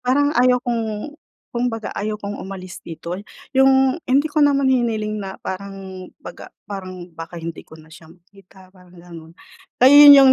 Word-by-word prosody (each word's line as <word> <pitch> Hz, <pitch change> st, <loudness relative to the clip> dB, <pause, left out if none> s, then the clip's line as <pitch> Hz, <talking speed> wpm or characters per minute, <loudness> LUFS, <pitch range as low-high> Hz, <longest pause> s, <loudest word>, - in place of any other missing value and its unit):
parang 285 Hz, +4 st, +1 dB
ayaw 250 Hz, -1 st, +4 dB
kong 230 Hz, +2 st, -3 dB, 0.4 s
kumbaga 235 Hz, -2 st, -3 dB
ayaw 210 Hz, +1 st, -3 dB
kong 205 Hz, 0 st, -6 dB
umalis 185 Hz, -1 st, -8 dB
dito. 170 Hz, +1 st, -7 dB, 0.4 s
Yung, 265 Hz, 0 st, +4 dB, 0.2 s
hindi 280 Hz, +3 st, +3 dB
ko 305 Hz, 0 st, -1 dB
naman 280 Hz, -1 st, +3 dB
hiniling 220 Hz, -5 st, 0 dB
na 190 Hz, -1 st, -7 dB
parang 190 Hz, -1 st, -8 dB
baga -, -, -11 dB, 0.2 s
parang 185 Hz, -3 st, -7 dB
baka 165 Hz, +1 st, -8 dB
hindi 165 Hz, -1 st, -7 dB
ko 160 Hz, -, -16 dB
na 160 Hz, 0 st, -17 dB
siya 160 Hz, -1 st, -15 dB
makita 185 Hz, +1 st, -20 dB
parang 180 Hz, -1 st, -19 dB
ganun. 165 Hz, -2 st, -13 dB, 0.5 s
Kaya 260 Hz, +3 st, +6 dB, 0.2 s
yun 285 Hz, -, +12 dB
yung 270 Hz, -1 st, +7 dB
200 Hz, 165 wpm, -20 LUFS, 180-250 Hz, 0.5 s, yun